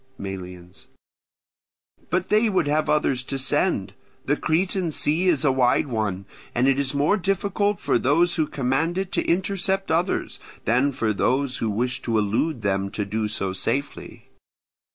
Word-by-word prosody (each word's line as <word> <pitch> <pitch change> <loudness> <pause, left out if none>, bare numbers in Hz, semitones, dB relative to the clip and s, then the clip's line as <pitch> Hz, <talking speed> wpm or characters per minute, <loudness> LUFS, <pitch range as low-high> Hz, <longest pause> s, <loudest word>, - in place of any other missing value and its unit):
Melians. 90 -2 -8 1.2
But 185 +1 -1
they 215 +2 +3
would 185 -5 +1
have 150 +1 +1
others 150 -4 +2
to 135 - -3
send. 135 - 0 0.3
The 145 - +2
Cretan 175 +3 0
Sea 160 +4 +1
is 155 -4 +2
a 135 - +5
wide 130 +1 +2
one, 105 -7 -2 0.3
and 125 +2 +3
it 135 0 +3
is 140 0 -1
more 150 +9 +3
difficult 200 +1 0
for - - +1
those 165 +8 +3
who 160 -3 0
command 140 +6 -1
it 190 -1 -2
to - - 0
intercept 190 +1 0
others, 170 +4 0 0.3
than 125 +5 +2
for 110 -4 -1
those 130 +6 0
who 115 - -1
wish 120 +5 -1
to 115 -2 0
elude 110 +6 0
them 100 -1 0
to 105 +1 -3
do 105 +2 -2
so 100 -2 -3
safely. 140 +8 -3
140 Hz, 160 wpm, -24 LUFS, 110-175 Hz, 1.2 s, a